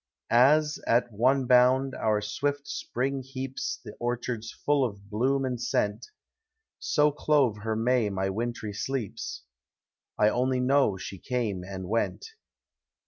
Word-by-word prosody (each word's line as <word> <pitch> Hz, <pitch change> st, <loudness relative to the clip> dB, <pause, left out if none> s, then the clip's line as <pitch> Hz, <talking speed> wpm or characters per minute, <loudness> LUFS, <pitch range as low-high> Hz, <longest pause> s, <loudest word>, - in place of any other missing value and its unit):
As, 150 Hz, +6 st, +4 dB
at 120 Hz, +1 st, +2 dB
one 130 Hz, +5 st, +2 dB
bound, 130 Hz, +2 st, +4 dB
our 105 Hz, -1 st, 0 dB
swift 145 Hz, +6 st, -2 dB
Spring 135 Hz, +2 st, -2 dB
heaps 135 Hz, -, -5 dB
The -, -, -8 dB
orchards 120 Hz, -2 st, -3 dB
full 145 Hz, -2 st, +1 dB
of 100 Hz, -4 st, -5 dB
bloom 135 Hz, +5 st, +1 dB
and 125 Hz, -2 st, -2 dB
sceut, 105 Hz, -4 st, -1 dB, 0.7 s
So 150 Hz, 0 st, +2 dB
clove 140 Hz, -6 st, +2 dB
her 110 Hz, +1 st, -2 dB
May 115 Hz, -1 st, +2 dB
my 95 Hz, 0 st, -1 dB
wintry 115 Hz, 0 st, -3 dB
sleeps; 120 Hz, 0 st, -4 dB, 0.4 s
— -, -, -66 dB
I 105 Hz, -, +4 dB
only 125 Hz, +3 st, +1 dB
know 130 Hz, -5 st, +3 dB
she 95 Hz, 0 st, -7 dB
came 115 Hz, -7 st, -2 dB
and 95 Hz, 0 st, -6 dB
weut. 115 Hz, -, -1 dB
125 Hz, 140 wpm, -27 LUFS, 105-135 Hz, 0.7 s, As